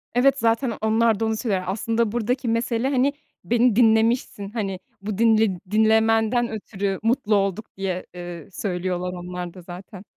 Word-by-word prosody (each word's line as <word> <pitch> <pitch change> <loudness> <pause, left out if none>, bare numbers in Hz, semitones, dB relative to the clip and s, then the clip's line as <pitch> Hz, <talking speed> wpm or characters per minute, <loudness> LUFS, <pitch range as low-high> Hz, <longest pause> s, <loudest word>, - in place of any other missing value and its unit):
Evet. 275 +3 +4
Zaten 230 +1 +1
onlar 220 0 +2
da 225 - 0
onu 220 0 0
söyler. 200 -7 -1
Aslında 225 +3 0
buradaki 240 +2 -1
mesele, 230 +2 0
hani, 275 +1 +2 0.3
beni 240 +4 +3
dinlemişsin. 225 -2 +2
Hani, 200 -4 -3 0.2
bu 200 -1 -4
dinle 220 -4 +3
dinlemenden 220 +2 +3
ötürü 200 -3 -3
mutlu 225 -2 +2
olduk 195 +2 0
diye, 185 -2 -3
eee, 175 -3 -8
söylüyorlar 180 -1 -3
onlar 180 -1 -6
da 185 - -11
zaten. 180 +2 -10
220 Hz, 150 wpm, -23 LUFS, 190-230 Hz, 0.3 s, Evet